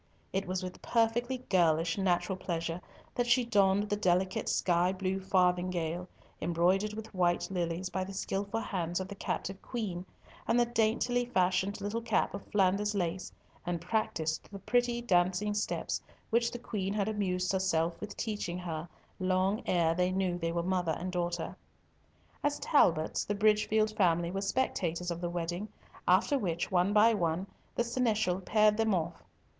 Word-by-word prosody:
It 195 0 -1
was 185 0 -2
with 180 0 -7
perfectly 240 +2 0
girlish 165 -3 +3
natural 185 -1 +1
pleasure 170 -1 -3 0.3
that 245 -1 0
she 245 0 +4
donned 200 -2 +3
the 205 - 0
delicate 185 -1 +1
sky 175 0 +2
blue 190 0 -2
farthingale, 180 -2 +1 0.3
embroidered 180 +6 +1
with 220 0 -8
white 175 -2 +1
lilies 175 0 -2
by 190 - -1
the 195 +1 -7
skilful 200 +3 -2
hands 175 -4 -2
of 190 - -4
the 200 - -7
captive 195 -1 -4
Queen, 205 -8 -4 0.4
and 235 - +3
the 240 - +5
daintily 240 +1 +1
fashioned 190 -3 +1
little 205 +3 -2
cap 230 -2 +1
of 200 - -6
Flanders 205 +1 +2
lace, 180 -1 -2 0.3
and 175 -1 -2
practised 165 -5 -1
the 200 - -6
pretty 240 +3 +1
dancing 185 0 +2
steps 205 - -2 0.3
which 235 +1 +3
the 240 - -6
Queen 205 -4 -3
had 205 -1 0
amused 185 -4 0
herself 170 -3 0
with 210 -1 -7
teaching 205 -5 -3
her 165 -2 -5 0.3
long 185 +4 +1
ere 170 -2 +3
they 180 +1 +1
knew 185 -1 0
they 165 -1 -2
were 170 0 -1
mother 180 -2 0
and 185 +2 -4
daughter. 175 -1 -2 0.9
As 290 0 +1
Talbots, 165 - +3
the 205 - -2
Bridgefield 215 +1 +2
family 175 -4 +2
were 195 +1 -2
spectators 180 -6 -1
of 170 0 -4
the 175 - -1
wedding, 175 +3 -3 0.4
after 285 -2 +4
which, 170 -6 -2
one 180 +2 +3
by 215 +2 +6
one, 175 -2 0 0.3
the 240 - +2
seneschal 220 -6 +1
paired 210 +2 +3
them 220 -3 +2
off. 165 -3 -3
190 Hz, 160 wpm, -31 LUFS, 175-215 Hz, 0.9 s, by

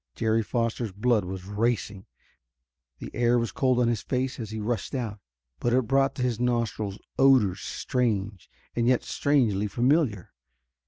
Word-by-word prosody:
Jerry 110 0 +1
Foster's 115 0 -2
blood 105 +1 +1
was 95 0 -6
racing; 105 -1 -2 0.9
the - - -8
air 120 0 +3
was 115 -2 -1
cold 130 -2 +1
on 120 - +3
his 115 -3 0
face 130 +1 -2
as 110 -3 -5
he 110 0 -5
rushed 110 +3 -2
out. 110 -5 -3 0.4
But 120 - 0
it 130 -1 +3
brought 135 +3 +2
to 130 - -2
his 120 -3 -1
nostrils 115 -5 -1 0.2
odors 125 -9 +5
strange 105 -6 -2 0.3
and 120 0 +1
yet 125 -1 +3
strangely 115 -8 +1
familiar. 125 - +1
115 Hz, 155 wpm, -26 LUFS, 105-125 Hz, 0.9 s, odors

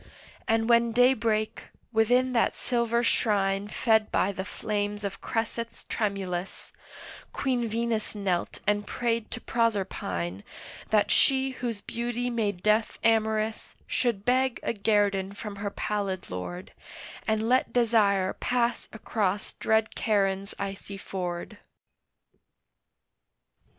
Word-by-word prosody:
And 225 0 +2
when 235 -1 +4
day 250 +2 +6
brake, 215 -2 -1 0.3
within 245 +4 +3
that 235 - +2
silver 235 -1 0
shrine 200 -3 +2
Fed 220 0 +2
by 195 - +2
the 190 -1 -4
flames 205 0 -3
of 195 -1 -4
cressets 230 +1 -3
tremulous, 195 -4 -3 0.6
Queen 250 -3 0
Venus 225 -1 -1
knelt 190 -4 -1
and 205 0 +1
prayed 230 -2 -1
to 245 - -4
Proserpine 190 - -1 0.5
That 210 -1 +3
she 265 0 +4
whose 240 -5 -4
beauty 240 +2 -3
made 205 -6 -1
Death 215 +1 +2
amorous 220 -1 +1
Should 230 -5 -1
beg 255 0 +2
a - - 0
guerdon 200 -2 +1
from 205 0 -7
her 205 0 -2
pallid 200 - -3
Lord, 175 - -6 0.5
And 220 0 +1
let 255 +2 +3
Desire 210 -5 +3
pass 240 -1 0
across 205 -3 -1
dread 220 0 +1
Charon's 195 -3 0
icy 195 0 -5
ford. 185 +2 -5
215 Hz, 115 wpm, -27 LUFS, 200-235 Hz, 0.6 s, day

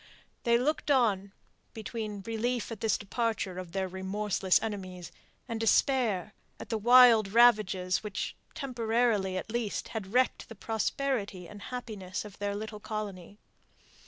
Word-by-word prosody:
They 235 0 +5
looked 295 +5 -1
on, 210 -8 +2 0.4
between 215 -2 -5
relief 230 +1 -2
at 225 - -7
this 225 - +2
departure 205 -3 -2
of 180 -2 -8
their 190 +1 -1
remorseless 190 0 0
enemies, 185 -5 -6 0.4
and 230 -2 -3
despair 225 -4 +2 0.3
at - - -9
the 225 - 0
wild 240 -2 +7
ravages 210 -6 +4
which, 210 -2 -4 0.2
temporarily 230 -7 0
at 200 - -5
least, 230 -3 -2
had 205 -4 -5
wrecked 250 +2 +1
the 225 - -9
prosperity 220 -3 -2
and 205 +2 -11
happiness 210 -6 -5
of 205 -2 -12
that 205 0 -2
little 215 0 -6
colony. 205 -3 -6
215 Hz, 135 wpm, -30 LUFS, 195-235 Hz, 0.4 s, wild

